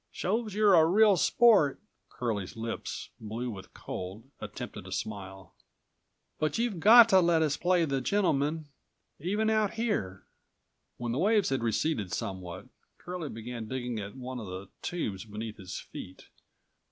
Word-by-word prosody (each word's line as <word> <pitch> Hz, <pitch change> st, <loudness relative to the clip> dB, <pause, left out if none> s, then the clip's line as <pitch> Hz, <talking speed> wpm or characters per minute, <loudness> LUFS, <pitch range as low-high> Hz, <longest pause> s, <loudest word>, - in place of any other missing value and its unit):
"Shows 215 Hz, +2 st, -2 dB
you're 210 Hz, -2 st, +5 dB
a 165 Hz, -3 st, +7 dB
real 205 Hz, +3 st, +5 dB
sport," 200 Hz, -, +4 dB, 0.3 s
Curlie's 110 Hz, -5 st, -3 dB
lips, 115 Hz, 0 st, -5 dB
blue 115 Hz, +3 st, -4 dB
with 95 Hz, -3 st, -10 dB
cold, 95 Hz, +4 st, -6 dB, 0.2 s
attempted -, -, -7 dB
a -, -, -9 dB
smile, 95 Hz, -2 st, -6 dB, 0.9 s
"but 155 Hz, -1 st, 0 dB
you've217 230 Hz, -6 st, -1 dB
got 230 Hz, +5 st, +9 dB
to 190 Hz, -3 st, +7 dB
let 170 Hz, -2 st, +3 dB
us 150 Hz, -2 st, +1 dB
play 175 Hz, -1 st, +2 dB
the 135 Hz, -3 st, -1 dB
gentleman, 155 Hz, -3 st, +1 dB, 0.5 s
even 205 Hz, +8 st, 0 dB
out 215 Hz, -2 st, +2 dB
here." 205 Hz, -, -2 dB, 0.7 s
When 120 Hz, -1 st, -3 dB
the 125 Hz, -, -1 dB
waves 210 Hz, +1 st, +3 dB
had 135 Hz, -2 st, 0 dB
receded 115 Hz, -, 0 dB
somewhat, 95 Hz, -1 st, -5 dB, 0.3 s
Curlie 175 Hz, -4 st, -6 dB
began 115 Hz, 0 st, -6 dB
digging 125 Hz, -2 st, -3 dB
at 100 Hz, +2 st, -7 dB
one 130 Hz, -1 st, -6 dB
of 110 Hz, -, -7 dB
the 95 Hz, +1 st, -7 dB
tubes 110 Hz, -, -3 dB
beneath 110 Hz, 0 st, -7 dB
his 95 Hz, -3 st, -7 dB
feet. 95 Hz, 0 st, -10 dB
135 Hz, 150 wpm, -29 LUFS, -, 0.9 s, got